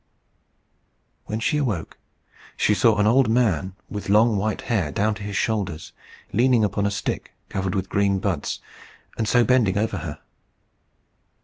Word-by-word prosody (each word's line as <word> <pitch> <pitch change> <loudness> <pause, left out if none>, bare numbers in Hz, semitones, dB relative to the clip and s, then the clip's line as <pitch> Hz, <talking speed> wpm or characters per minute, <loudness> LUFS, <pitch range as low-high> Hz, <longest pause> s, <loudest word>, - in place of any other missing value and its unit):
When 110 +1 -3
she 150 +6 +1
awoke, 115 - -2 0.6
she 105 - +3
saw 105 +1 +3
an 105 - +3
old 120 +2 +4
man 95 -6 +1
with 105 -1 -6
long 110 +2 +4
white 105 +2 -1
hair 95 - -1
down 105 +8 +1
to 100 - -9
his 100 -1 -5
shoulders, 100 -8 -2 0.4
leaning 120 0 +3
upon 100 0 0
a - - +1
stick 100 -1 -4 0.2
covered 95 0 -2
with 95 -1 -1
green 100 0 +1
buds, - - -2 0.6
and 110 - 0
so 120 +2 +4
bending 115 -5 +3
over 110 -1 0
her. 80 -3 -6
105 Hz, 150 wpm, -23 LUFS, 95-115 Hz, 0.6 s, old